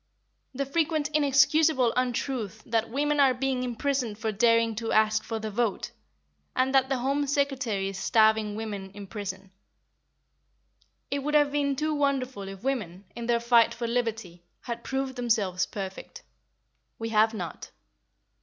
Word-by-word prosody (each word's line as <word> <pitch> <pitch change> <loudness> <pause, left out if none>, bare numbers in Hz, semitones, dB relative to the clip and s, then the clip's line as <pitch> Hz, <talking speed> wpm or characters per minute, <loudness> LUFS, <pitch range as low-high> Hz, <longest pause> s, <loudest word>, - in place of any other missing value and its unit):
The 275 +2 -1
frequent 310 +1 0
inexcusable 285 -2 +4
untruth 245 -4 -2
that 225 -1 0
"women 290 +4 0
are 270 -2 +5
being 260 0 -1
imprisoned 250 -2 -2
for 220 0 -2
daring 230 +1 +3
to 230 -1 -3
ask 215 0 +3
for 225 -1 -4
the 220 0 -5
vote," 225 -1 -1 0.6
and 260 +1 +1
that 265 -1 +4
the 270 - +1
Home 275 +3 0
Secretary 260 -8 0
is 195 -1 -6
starving 220 0 +3
women 205 -3 -5
in 205 -1 -8
prison. 195 -2 -7 1.6
It 280 - 0
would 300 +2 -2
have 290 -1 +4
been 285 -1 0
too 305 +3 -1
wonderful 265 -7 -1
if 195 +1 -9
women, 205 -9 -3
in 235 -1 -5
their 235 -1 +2
fight 235 0 +4
for 235 0 -4
liberty, 225 -7 -3 0.2
had 235 -1 -6
proved 270 -1 -3
themselves 210 -7 0
perfect. 195 -2 -7 0.7
We 225 0 -4
have 220 0 +3
not. 175 -6 -6
235 Hz, 150 wpm, -27 LUFS, 215-275 Hz, 1.6 s, are